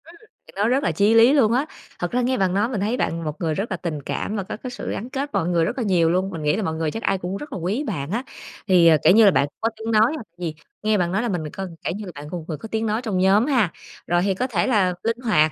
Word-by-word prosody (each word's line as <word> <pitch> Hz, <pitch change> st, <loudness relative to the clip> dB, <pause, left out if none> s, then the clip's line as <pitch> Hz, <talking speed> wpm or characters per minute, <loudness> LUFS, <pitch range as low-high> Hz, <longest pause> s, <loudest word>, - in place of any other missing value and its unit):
Ừm, 330 Hz, -, -14 dB, 0.3 s
thì -, -, -16 dB
nó 205 Hz, +2 st, +1 dB
rất 260 Hz, +4 st, +2 dB
là -, -, +1 dB
chí 205 Hz, +2 st, +3 dB
lý 230 Hz, +4 st, +7 dB
luôn 250 Hz, -7 st, +4 dB
á. 255 Hz, +5 st, +2 dB, 0.3 s
Thật 175 Hz, -, -2 dB
ra 250 Hz, -, +1 dB
nghe 255 Hz, +1 st, +1 dB
bạn 185 Hz, -2 st, +1 dB
nói 205 Hz, +4 st, +1 dB
mình 225 Hz, -7 st, -2 dB
thấy 220 Hz, +5 st, 0 dB
bạn 165 Hz, -7 st, -1 dB
một 150 Hz, -2 st, -3 dB
người 160 Hz, -2 st, 0 dB
rất 200 Hz, +7 st, -3 dB
là 185 Hz, -, -1 dB
tình 160 Hz, -4 st, -4 dB
cảm 205 Hz, -, -3 dB
và 200 Hz, -, -2 dB
có 185 Hz, -, -6 dB
cái 250 Hz, +2 st, -7 dB
sự 245 Hz, -, -6 dB
gắn 235 Hz, -, -5 dB
kết 275 Hz, +2 st, -3 dB
mọi 165 Hz, -, 0 dB
người 170 Hz, -2 st, +2 dB
rất 245 Hz, -, -3 dB
là 250 Hz, -, -1 dB
nhiều 175 Hz, -6 st, +3 dB
luôn, 185 Hz, +3 st, +1 dB
mình 165 Hz, -5 st, -6 dB
nghĩ 150 Hz, 0 st, +2 dB
là 215 Hz, -, -2 dB
mọi 160 Hz, -, -1 dB
người 160 Hz, -1 st, -1 dB
chắc 225 Hz, -, -6 dB
ai 195 Hz, -, +1 dB
cũng 185 Hz, +1 st, -4 dB
rất 290 Hz, +5 st, -8 dB
là -, -, -3 dB
quý 195 Hz, -, -1 dB
bạn 165 Hz, -, -4 dB
á. 235 Hz, +5 st, -1 dB, 0.4 s
Thì, 180 Hz, -3 st, +6 dB
ờ, 160 Hz, -2 st, +7 dB
kiểu -, -, +7 dB
như 220 Hz, +1 st, +7 dB
là, 200 Hz, -, +7 dB
bạn 140 Hz, -, +3 dB
cũng -, -, -23 dB
có 225 Hz, -, +2 dB
tiếng 225 Hz, +1 st, -4 dB
nói 220 Hz, +1 st, +4 dB
hoặc 275 Hz, -, -7 dB
gì 170 Hz, -3 st, -3 dB, 0.3 s
nghe 215 Hz, 0 st, +2 dB
bạn 175 Hz, -2 st, 0 dB
nói 195 Hz, +4 st, +1 dB
là 240 Hz, -, -1 dB
mình 175 Hz, -5 st, -2 dB
mình 150 Hz, -, -6 dB
coi 190 Hz, 0 st, -5 dB, 0.2 s
kiểu -, -, -1 dB
như 210 Hz, -, -7 dB
là, 180 Hz, -, -7 dB
bạn 145 Hz, -, -8 dB
một 180 Hz, -, -3 dB
người 165 Hz, -, -8 dB
vừa 155 Hz, -, -4 dB
có 225 Hz, -, -9 dB
tiếng 220 Hz, 0 st, -1 dB
nói 220 Hz, +1 st, 0 dB
trong 215 Hz, -6 st, -2 dB
nhóm 195 Hz, +5 st, +4 dB
ha, 245 Hz, -, +2 dB, 0.4 s
rồi 175 Hz, 0 st, +2 dB
thì 195 Hz, 0 st, +1 dB
có 250 Hz, +7 st, -2 dB
thể 205 Hz, -6 st, 0 dB
là 200 Hz, -7 st, +2 dB
linh 230 Hz, +1 st, 0 dB
hoạt, 210 Hz, -11 st, +3 dB
200 Hz, 335 wpm, -22 LUFS, 175-230 Hz, 0.4 s, lý